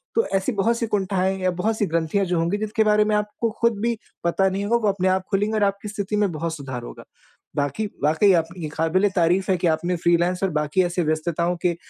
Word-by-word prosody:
तो 460 - +3
ऐसी 190 +6 0
बहुत 225 +2 +1
सी 230 - -1
कुंठाएँ 190 -2 0
या 185 - +2
बहुत 220 +1 0
सी 205 - +1
ग्रंथियाँ 165 +4 0
जो 180 -1 -1
होंगी, 170 +5 0
जिसके 215 +1 0
बारे 210 0 +4
में 210 0 +1
आपको 210 +2 -1
ख़ुद 235 -2 +2
भी 235 0 0 0.3
पता 190 +3 +2
नहीं 195 +1 -3
होगा, 235 +3 +2
वो 220 -3 -1
अपने 190 -1 -1
आप 185 0 +2
खुलेंगी 205 +2 +1
और 215 - +2
आपकी 200 +1 -1
स्थिति 205 0 -3
में 205 -3 +2
बहुत 165 +1 -3
सुधार 130 -5 -6
होगा। - - -10 0.5
बाक़ी 145 +9 -1 0.2
वाक़ई 160 +7 +4
आपकी 165 0 -8
क़ाबिल-ए-तारीफ़ 180 +3 +1
है 185 - +2
कि 175 - 0
आपने 170 +3 0
फ्रीलांस 175 +2 +1
और 195 - +2
बाक़ी 150 +5 +1
ऐसे 175 0 -1
व्यस्तताओं 165 +2 0
के 175 -1 +2
190 Hz, 220 wpm, -23 LUFS, 170-210 Hz, 0.5 s, बारे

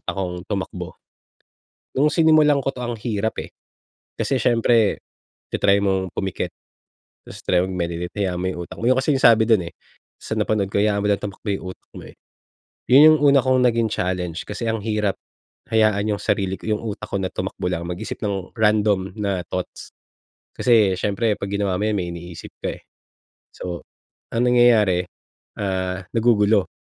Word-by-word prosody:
utak - - -4
kong 90 -2 -4
tumakbo. 100 -3 -4 1.0
Nung 150 +2 +4
sinimulan 155 -2 +4
ko 135 - -1
'to 125 - -7
ang 120 -1 -3
hirap 110 -1 -2
eh, - - -10 0.7
kasi 135 - +1
siyempre 115 -2 +3 0.5
ta-try 100 0 +3
mong 95 -1 0
pumikit, 95 -2 -2 0.8
tapos - - -11
try 90 - +3
mag-meditate 90 -2 -3
hayaan 90 -2 -2
mo - - 0
'yong 90 - -7
utak - - -10
mo, 115 - -3
'yon 130 - +3
kasi 140 +1 +1
yung 135 - -2
sabi 110 -1 +7
dun 100 -7 +3
eh, - - -10 0.5
sa - - -5
napanood 105 -3 0
ko, 100 - +1
hayaan 105 -1 +2
mo - - +1
lang 100 - +1
tumakbo 105 +1 -7
'yong 95 -2 -2
utak - - -45
mo, - - -9
eh. - - -15 0.7
Yun 135 +3 +8
yung 155 - +3
una 140 - +6
kong 130 -1 +3
naging 115 -1 +2
challenge, 90 -2 -2
kasi 115 +3 -4
ang 110 -1 -1
hirap 105 -3 0 0.6
hayaan 105 -1 +2
yung - - -11
sarili 95 -2 0
ko, - - -15
yung 105 - 0
utak 110 -1 -5
ko 100 - -1
na 95 -1 -2
tumakbo - - -4
lang, 85 -2 -3
mag-isip 90 0 -5
ng 100 -3 -3
random 105 -3 +1
na 100 -3 -1
thoughts. 90 -1 -6 0.6
Kasi 110 -6 +4
siyempre 105 +2 0
'pag 100 - -5
ginawa 100 -2 0
mo - - 0
yun 105 - 0
may 90 - -3
iniisip 85 0 -9
ka, - - -3
eh. - - -19 0.7
So, 90 -1 -6 0.5
ang 120 +2 +2
nangyayari, 110 -7 +4 0.5
ah, 95 -1 -2
nagugulo, 110 -4 +3
100 Hz, 175 wpm, -22 LUFS, 95-115 Hz, 1.0 s, Yun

